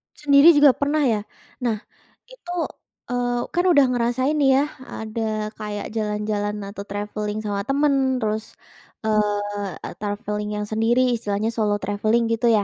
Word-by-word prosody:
Sendiri 295 Hz, +3 st, +6 dB
juga 290 Hz, -1 st, +7 dB
pernah 290 Hz, +3 st, 0 dB
ya? 225 Hz, -6 st, +2 dB, 0.4 s
Nah, 235 Hz, -4 st, 0 dB, 0.5 s
itu, -, -, -9 dB, 0.6 s
eee, 245 Hz, 0 st, 0 dB
kan 350 Hz, -, +1 dB
udah 290 Hz, -6 st, +6 dB
ngerasain 250 Hz, +4 st, +1 dB
nih 280 Hz, -2 st, +4 dB
ya, -, -, +1 dB, 0.2 s
ada 215 Hz, -1 st, -3 dB
kayak 210 Hz, -1 st, -5 dB
jalan-jalan 210 Hz, -1 st, -2 dB, 0.2 s
atau 200 Hz, 0 st, -7 dB
traveling 210 Hz, +1 st, -3 dB
sama 205 Hz, -1 st, -2 dB
teman, 275 Hz, -2 st, +2 dB
terus, 215 Hz, 0 st, -3 dB, 0.5 s
eee, 205 Hz, -2 st, -1 dB
traveling 210 Hz, 0 st, -3 dB
yang -, -, -2 dB
sendiri, 240 Hz, +3 st, +2 dB
istilahnya 210 Hz, 0 st, -1 dB
solo 215 Hz, -2 st, +1 dB
traveling 215 Hz, +3 st, +1 dB
gitu 230 Hz, +1 st, +1 dB
ya. 215 Hz, -3 st, +4 dB
220 Hz, 140 wpm, -23 LUFS, 210-260 Hz, 0.6 s, juga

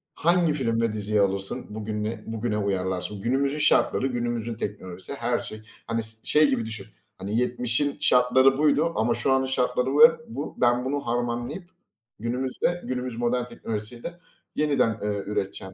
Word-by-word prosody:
Hangi 170 Hz, -1 st, +2 dB
film 115 Hz, -5 st, 0 dB
ve 115 Hz, -2 st, 0 dB
diziyi 105 Hz, 0 st, 0 dB
alırsın? 95 Hz, 0 st, -1 dB
Bugününe, 105 Hz, 0 st, -4 dB
bugüne 110 Hz, -1 st, -3 dB
uyarlarsın. 95 Hz, 0 st, -2 dB
Günümüzün 135 Hz, +5 st, 0 dB
şartları, 135 Hz, -2 st, +4 dB
günümüzün 120 Hz, -2 st, -3 dB
teknolojisi, 95 Hz, 0 st, -6 dB
her 120 Hz, -2 st, -1 dB
şey. 110 Hz, 0 st, -6 dB, 0.3 s
Hani 115 Hz, 0 st, -1 dB
s 110 Hz, 0 st, +2 dB
şey 150 Hz, 0 st, +5 dB
gibi 115 Hz, -4 st, -1 dB
düşün, 110 Hz, -3 st, -6 dB, 0.3 s
hani, 100 Hz, +4 st, -3 dB
70'in 125 Hz, +3 st, +3 dB
şartları 130 Hz, +2 st, +4 dB
buydu 155 Hz, +2 st, +2 dB
ama 110 Hz, +2 st, +1 dB
şu 135 Hz, -, +1 dB
an, 130 Hz, 0 st, +2 dB
şartları 125 Hz, -1 st, 0 dB
ve 160 Hz, +1 st, +8 dB, 0.2 s
bu, 145 Hz, -, -5 dB
ben 120 Hz, +1 st, +2 dB
bunu 145 Hz, +2 st, -1 dB
harmanlayıp 120 Hz, +8 st, -3 dB, 0.5 s
günümüzde, 130 Hz, +9 st, -2 dB
günümüz 125 Hz, -2 st, -4 dB
modern 120 Hz, +1 st, 0 dB
teknolojisiyle 115 Hz, +6 st, -6 dB, 0.4 s
yeniden, 140 Hz, -7 st, +1 dB
ııı, 105 Hz, -1 st, -2 dB
üreteceğim. 95 Hz, -2 st, -4 dB
120 Hz, 150 wpm, -25 LUFS, 110-130 Hz, 0.5 s, ve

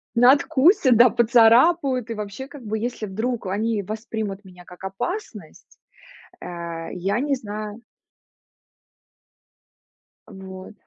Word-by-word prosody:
Надкусят, 270 Hz, -, +4 dB
да, 245 Hz, 0 st, +7 dB
поцарапают, 245 Hz, +3 st, +4 dB
и -, -, -2 dB
вообще, 210 Hz, +5 st, -7 dB
как 280 Hz, -3 st, -12 dB
бы 215 Hz, +1 st, -3 dB
если 235 Hz, -1 st, -4 dB
вдруг 220 Hz, +2 st, -3 dB
они 210 Hz, +1 st, -1 dB
воспримут 215 Hz, -1 st, -5 dB
меня 180 Hz, -1 st, -14 dB
как 180 Hz, +1 st, -15 dB
опасность, 200 Hz, -, -7 dB, 0.6 s
а, 170 Hz, -2 st, -7 dB
я 200 Hz, +6 st, -1 dB
не 285 Hz, 0 st, 0 dB
знаю 215 Hz, 0 st, -7 dB, 2.5 s
Вот. 190 Hz, +1 st, -10 dB
220 Hz, 105 wpm, -23 LUFS, 195-250 Hz, 2.5 s, да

